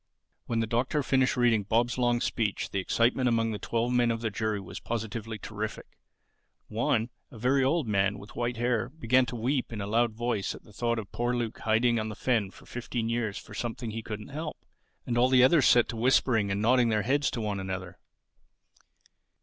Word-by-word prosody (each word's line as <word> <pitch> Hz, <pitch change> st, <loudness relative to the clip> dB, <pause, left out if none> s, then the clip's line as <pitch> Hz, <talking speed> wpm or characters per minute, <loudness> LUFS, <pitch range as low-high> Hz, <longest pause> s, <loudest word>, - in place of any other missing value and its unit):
When 115 Hz, -1 st, 0 dB
the -, -, +1 dB
Doctor 125 Hz, +6 st, 0 dB
finished 130 Hz, -1 st, +2 dB
reading 120 Hz, -3 st, +4 dB
Bob's 115 Hz, +4 st, +1 dB
long 120 Hz, -1 st, +2 dB
speech 110 Hz, -6 st, -1 dB
the 100 Hz, -, -1 dB
excitement 120 Hz, +6 st, +2 dB
among 115 Hz, -1 st, +1 dB
the 105 Hz, -, -4 dB
twelve 120 Hz, +1 st, -1 dB
men 120 Hz, -1 st, +3 dB
of 115 Hz, -1 st, -1 dB
the 115 Hz, -2 st, -1 dB
jury 110 Hz, 0 st, -1 dB
was 95 Hz, -, -8 dB
positively 115 Hz, -1 st, -4 dB
terrific. 105 Hz, 0 st, -6 dB, 0.7 s
One, 115 Hz, +2 st, 0 dB, 0.2 s
a -, -, -12 dB
very 130 Hz, +4 st, +2 dB
old 145 Hz, 0 st, +1 dB
man 100 Hz, -1 st, +1 dB
with 100 Hz, -, -12 dB
white 120 Hz, 0 st, -2 dB
hair, 120 Hz, 0 st, 0 dB
began 130 Hz, -3 st, +2 dB
to 120 Hz, -, -5 dB
weep 125 Hz, +3 st, -1 dB
in 110 Hz, -, -5 dB
a 100 Hz, -, -3 dB
loud 115 Hz, +2 st, +1 dB
voice 120 Hz, -3 st, -2 dB
at -, -, -13 dB
the 105 Hz, -, -18 dB
thought 115 Hz, +2 st, 0 dB
of 105 Hz, -3 st, -6 dB
poor 120 Hz, +1 st, -1 dB
Luke 120 Hz, -2 st, -3 dB
hiding 115 Hz, +1 st, +2 dB
on 110 Hz, 0 st, -3 dB
the 105 Hz, -, -6 dB
fen 115 Hz, -4 st, 0 dB
for -, -, -16 dB
fifteen 120 Hz, -1 st, -4 dB
years 115 Hz, -3 st, -1 dB
for 105 Hz, -, -10 dB
something 115 Hz, +1 st, -4 dB
he 115 Hz, +1 st, -4 dB
couldn't 105 Hz, -1 st, -7 dB
help. 155 Hz, +2 st, -5 dB, 0.5 s
And 120 Hz, -1 st, 0 dB
all 125 Hz, +1 st, +4 dB
the 130 Hz, -1 st, +6 dB
others 140 Hz, +1 st, +5 dB
set 120 Hz, -1 st, +5 dB
to -, -, -4 dB
whispering 115 Hz, -3 st, +2 dB
and 100 Hz, +2 st, -1 dB
nodding 120 Hz, +1 st, +4 dB
their 105 Hz, -2 st, +1 dB
heads 140 Hz, +5 st, +2 dB
to 115 Hz, -, -4 dB
one 105 Hz, -2 st, -2 dB
another. 95 Hz, -2 st, -5 dB
115 Hz, 205 wpm, -28 LUFS, 110-125 Hz, 0.7 s, the